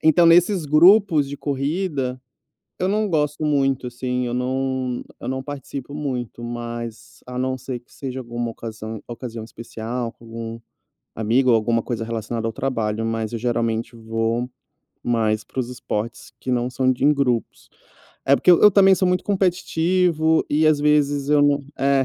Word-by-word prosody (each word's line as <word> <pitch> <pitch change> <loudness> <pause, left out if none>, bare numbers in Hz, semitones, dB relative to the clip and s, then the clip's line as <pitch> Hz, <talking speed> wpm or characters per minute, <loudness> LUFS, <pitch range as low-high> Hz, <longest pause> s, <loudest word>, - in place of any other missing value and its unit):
Então, 160 +2 +5
nesses 175 +1 +5
grupos 160 0 +5
de 145 - -6
corrida 140 -2 -2 0.6
eu 185 - +1
não 215 +1 +1
gosto 150 -2 0
muito, 135 -3 +1
assim, 125 +1 -2
eu 120 - -3
não 130 0 -1 0.2
eu - - -6
não 130 +1 -2
participo 140 -1 -7
muito, 125 -5 -4
mas 120 -1 -6
a 125 0 -7
não 130 +1 -1
ser 130 -1 -5
que 120 - -31
seja 130 -1 -5
alguma 120 -1 -4
ocasão 110 -1 -7
ocasião 115 -1 -6
especial, 115 +1 -5
com 115 - -19
algum 115 0 -6 0.6
amigo 120 +4 +2
ou 115 - +6
alguma 115 +1 +1
coisa 115 -1 -3
relacionada 115 0 -3
ao - - -4
trabalho. 115 -4 -2
Mas 115 -1 -2
eu 115 - -2
geralmente 115 0 -1
vou 115 +2 -2 0.5
mais 110 -2 +1
para 130 - -6
os 120 - -2
esportes 115 -2 -5
que - - -7
não 125 0 +1
são 130 0 +1
de 130 - -3
em 150 +1 +6
grupos. 125 -5 -1 0.6
É, 140 - +5
porque - - +4
eu 175 - +6
eu 210 - +9
também 195 -1 +6
sou 185 0 +1
muito 180 0 +1
competitivo, 180 -4 +2
e 155 +2 +3
às 155 -1 +4
vezes 145 -1 +2
eu 150 0 +4
não 145 0 +3 0.2
É 135 0 +3
130 Hz, 170 wpm, -22 LUFS, 115-150 Hz, 0.6 s, eu